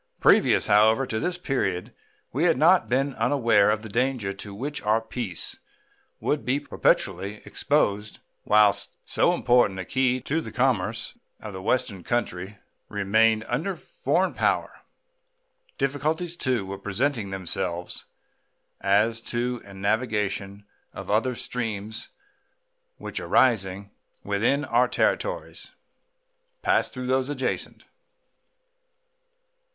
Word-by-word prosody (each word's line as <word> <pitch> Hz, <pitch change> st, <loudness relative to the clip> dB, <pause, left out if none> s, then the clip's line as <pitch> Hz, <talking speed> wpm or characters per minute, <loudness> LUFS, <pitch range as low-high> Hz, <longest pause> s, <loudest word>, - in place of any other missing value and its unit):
Previous, -, -, +4 dB
however, 110 Hz, +5 st, +4 dB
to 110 Hz, -3 st, -2 dB
this 180 Hz, +5 st, -1 dB
period 95 Hz, -, -2 dB, 0.4 s
we 150 Hz, +8 st, +1 dB
had 165 Hz, -5 st, +3 dB
not 170 Hz, +6 st, +4 dB
been 135 Hz, +3 st, +1 dB
unaware 115 Hz, -4 st, +3 dB
of 110 Hz, +1 st, 0 dB
the -, -, -6 dB
danger 115 Hz, -2 st, -1 dB
to 100 Hz, +1 st, -9 dB
which 140 Hz, +9 st, -5 dB
our 110 Hz, +2 st, +2 dB
peace 110 Hz, -5 st, -5 dB, 0.6 s
would 150 Hz, -, -1 dB
be 130 Hz, +3 st, +1 dB
perpetually 105 Hz, -7 st, 0 dB
exposed 105 Hz, -8 st, 0 dB, 0.3 s
whilst 105 Hz, -2 st, +3 dB
so -, -, +2 dB
important 120 Hz, -6 st, +3 dB
a 95 Hz, -, -4 dB
key 130 Hz, +4 st, +1 dB
to 160 Hz, +6 st, -1 dB
the -, -, -8 dB
commerce 125 Hz, -7 st, 0 dB, 0.2 s
of 105 Hz, -2 st, -8 dB
the 95 Hz, -, -6 dB
Western 105 Hz, -3 st, 0 dB
country 100 Hz, -4 st, -2 dB, 0.3 s
remained 110 Hz, +2 st, +2 dB
under 160 Hz, +11 st, -1 dB
foreign -, -, -1 dB
power. -, -, 0 dB, 1.0 s
Difficulties, 155 Hz, +5 st, -1 dB
too, 130 Hz, -, -1 dB
were 95 Hz, 0 st, -6 dB
presenting 110 Hz, +2 st, -1 dB
themselves 90 Hz, -2 st, -3 dB, 0.7 s
as 105 Hz, +4 st, +2 dB
to 120 Hz, +1 st, -2 dB
the 100 Hz, -2 st, -13 dB
navigation 100 Hz, -1 st, -1 dB, 0.3 s
of -, -, -6 dB
other 120 Hz, +4 st, +1 dB
streams 110 Hz, -3 st, -4 dB, 0.9 s
which, -, -, -5 dB
arising 100 Hz, -5 st, +2 dB, 0.3 s
within 115 Hz, +8 st, +1 dB
our 125 Hz, 0 st, +3 dB
territories, -, -, -1 dB, 0.9 s
pass -, -, +2 dB
through 125 Hz, -1 st, -6 dB
those 130 Hz, +1 st, +1 dB
adjacent. 135 Hz, -3 st, -3 dB
115 Hz, 115 wpm, -25 LUFS, 100-130 Hz, 1.0 s, Previous